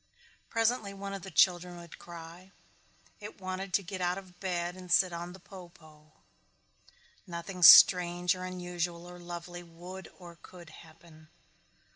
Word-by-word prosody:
Presently 225 -3 0
one 200 0 -7
of 195 - -6
the 190 - -9
children 180 0 +2
would 170 -1 -12
cry. 170 +2 -12 0.7
It 210 -1 -10
wanted 185 0 -5
to 200 - +1
get 185 +1 -7
out 180 +1 0
of 185 -2 -12
bed 175 -2 -3
and 180 -1 -11
sit 180 0 +4
on 170 +1 -6
the 190 - -13
po 185 -1 -13
po. 155 -2 -20 1.1
Nothing 180 +2 -7
strange 175 0 +8
or 185 0 -8
unusual 175 -1 -5
or 180 0 -11
lovely 175 0 -8
would 175 +2 -11
or 170 -2 -13
could 175 -4 -14
happen. 155 0 -17
175 Hz, 150 wpm, -30 LUFS, 170-185 Hz, 1.1 s, strange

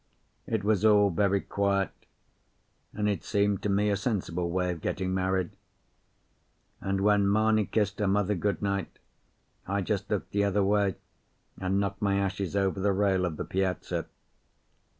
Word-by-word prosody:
It 110 -3 -1
was 105 -1 +1
all 105 -2 +5
very 100 +2 +2
quiet, 100 -1 0 1.0
and 105 0 -1
it 100 -2 -1
seemed 100 -2 +1
to 105 - -1
me 105 +1 +2
a - - +2
sensible 90 -5 -2
way 90 +1 0
of 85 -3 -6
getting 95 0 -2
married; 95 -1 0 1.3
and 95 0 -1
when 100 -1 +3
Mamie 110 0 +3
kissed 105 -2 0
her 105 - +1
mother 100 +1 +2
good 100 +2 -1
night, 100 -3 -2 0.7
I 100 +1 0
just 100 0 -2
looked 105 - -2
the 100 0 +1
other 100 0 +2
way, 100 -1 +2 0.6
and 95 +1 0
knocked 100 -1 -2
my 100 -1 +2
ashes 100 -1 -2
over 95 -1 +1
the 100 +1 +2
rail 95 -2 +2
of 80 -4 -3
the - - -4
piazza. 95 -1 -2
100 Hz, 160 wpm, -28 LUFS, 95-105 Hz, 1.3 s, all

